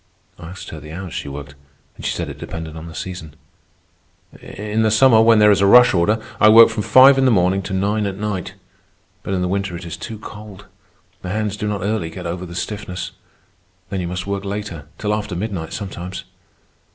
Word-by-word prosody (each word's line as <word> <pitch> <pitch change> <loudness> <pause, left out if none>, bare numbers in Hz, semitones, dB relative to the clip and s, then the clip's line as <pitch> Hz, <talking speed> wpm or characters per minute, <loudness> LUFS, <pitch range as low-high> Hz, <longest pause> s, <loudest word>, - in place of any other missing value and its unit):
I 80 - -9
asked 95 +1 -9
her 80 - -7
the 75 +1 -11
hours 90 +1 -7
she - - -5
worked, 70 0 -8 0.4
and - - -12
she - - 0
said - - -3
it - - -9
depended 80 -1 -7
on 80 +1 -8
the 80 - -10
season. 90 -5 -7 1.1
"In 105 +2 -3
the 110 - +3
summer, 110 +1 +5
when 115 0 +5
there 105 0 +6
is 100 - +3
a 100 - +4
rush 125 +4 +7
order, 95 +5 +2 0.2
I 105 - +7
work 115 +1 +9
from 110 -1 -3
five 135 +5 +7
in 135 - +3
the - - +5
morning 95 -3 +2
to 95 - -6
nine 105 +2 0
at 95 -1 -5
night. 105 -3 -4 0.7
But 95 - -3
in 90 - -1
the - - 0
winter 95 -1 -2
it 85 - -9
is 85 - -6
too 110 -2 -7
cold. 105 -2 -11 0.6
The 90 - -6
hands 105 +1 -2
do 105 - -4
not 105 -3 -2
early 100 -5 -1
get - - -9
over 90 +2 -4
the 85 - -9
stiffness. 90 0 -5 0.8
Then 95 - -2
you 85 - -3
must 90 0 -4
work 100 0 -3
later—till 100 -2 -5
after 105 -3 -3
midnight 90 -4 -4
sometimes. 95 -2 -6
100 Hz, 215 wpm, -20 LUFS, 90-105 Hz, 1.1 s, work